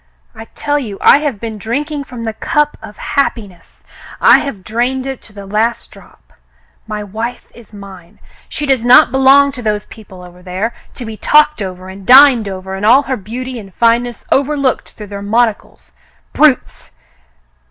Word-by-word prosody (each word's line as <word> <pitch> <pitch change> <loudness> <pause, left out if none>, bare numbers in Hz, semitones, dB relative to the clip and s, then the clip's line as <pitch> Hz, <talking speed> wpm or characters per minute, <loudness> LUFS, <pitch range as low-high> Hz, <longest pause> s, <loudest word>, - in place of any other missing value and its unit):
I 225 - -10
tell 290 0 -1
you 215 -8 -7
I - - +6
have 290 -8 -3
been 220 -1 -6
drink 270 +9 -3
ing 290 -2 -4
from 250 -3 -9
the 225 -1 -3
cup 295 +6 -1
of 210 - -12
happiness. 205 - -4 0.4
I - - +6
have 220 -10 -6
drained 245 +5 -2
it 270 -2 -6
to - - -14
the 200 -1 -11
last 215 +4 -2
drop. - - -19 0.5
My 210 -1 -5
wife 225 +5 -6
is 235 -3 -17
mine. 195 -2 -13 0.3
She 300 - -4
does 265 -4 +1
not 245 0 +6
belong 270 +1 +5
to 260 -2 -9
those 210 -2 -2
people 190 -5 -14
over 180 0 -15
there, 190 +6 -4 0.2
to 245 - -7
be 220 -1 -8
talked 300 -1 +3
over, 185 -1 -6
and 190 +1 -11
dined 250 -2 +6
over, 190 0 -7
and 195 +1 -6
all 250 +6 +5
her 265 -1 -2
beauty 245 +4 -7
and 195 -3 -12
fineness 235 0 0
overlooked 275 -2 0
through 210 - -10
their 200 - -6
mon 225 +4 +2
ocles 210 - -15 0.2
— - - -39
brutes 295 -5 +1
230 Hz, 185 wpm, -15 LUFS, 205-265 Hz, 0.5 s, I